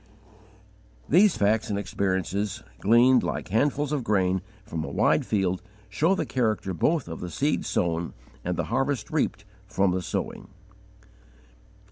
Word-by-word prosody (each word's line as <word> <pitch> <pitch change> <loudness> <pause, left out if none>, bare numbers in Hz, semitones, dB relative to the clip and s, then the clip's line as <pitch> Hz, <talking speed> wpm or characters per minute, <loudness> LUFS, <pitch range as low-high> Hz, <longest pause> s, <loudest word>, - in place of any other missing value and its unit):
These 190 +4 +5
facts 110 +2 +2
and 100 - -1
experiences, 100 0 -2 0.2
gleaned, 120 +4 +5
like - - -3
handfuls 140 +7 +1
of 145 -4 -1
grain, 95 -4 +1 0.2
from 80 -1 -4
a - - -5
wide - - +2
field, 95 -3 0 0.3
show 155 - +2
the - - -1
character 110 -6 -1
both 150 - +1
of 80 -1 -6
the 90 - -5
seed 145 - 0
sown 85 -1 -1 0.3
and 90 0 -2
the - - 0
harvest 135 -1 0
reaped, 140 -9 -1 0.2
from 95 -2 +1
the 90 +1 -1
sowing. - - -4
105 Hz, 140 wpm, -26 LUFS, 95-135 Hz, 0.3 s, These